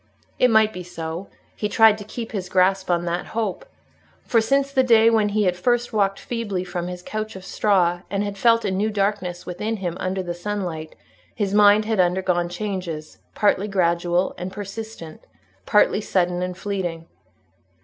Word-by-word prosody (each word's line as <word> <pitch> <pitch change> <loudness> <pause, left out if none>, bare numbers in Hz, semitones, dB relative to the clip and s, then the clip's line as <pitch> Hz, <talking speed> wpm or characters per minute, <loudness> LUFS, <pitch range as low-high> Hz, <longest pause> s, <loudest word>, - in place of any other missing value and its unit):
It 250 - +5
might 220 -1 +4
be 180 - -6
so; 170 +1 -6 0.3
he 210 - -2
tried 220 0 +5
to - - -7
keep 225 +2 -7
his 190 -4 -4
grasp 190 +1 +2
on 175 -1 +1
that 175 +1 -2
hope. 230 - -2 0.6
For, 230 - +2
since 275 +4 +1
the 265 -2 +3
day 230 -3 +5
when 215 -2 +3
he 210 +1 +1
had 180 -2 +2
first 240 +6 0
walked 195 -2 +1
feebly 210 -6 -3
from 175 -1 -4
his 180 0 -7
couch 215 +1 -5
of 190 0 -9
straw, 175 -4 +1
and 200 +1 -1
had 205 -1 -4
felt 230 +2 +3
a 200 - 0
new 200 +3 0
darkness 195 -4 -2
within 210 +5 -3
him 175 -4 -3
under 185 0 -2
the 175 -1 -4
sunlight, 175 -4 -4 0.4
his 200 -2 -1
mind 210 +1 +6
had 220 -2 -1
undergone 180 -1 +1
changes, 175 -5 -5 0.2
partly 205 -1 +2
gradual 175 -1 +1
and 180 +1 -5
persistent, 205 -4 -8 0.5
partly 210 0 +4
sudden 180 -3 0
and 180 0 -3
fleeting. 185 -5 -3
195 Hz, 175 wpm, -23 LUFS, 180-215 Hz, 0.6 s, mind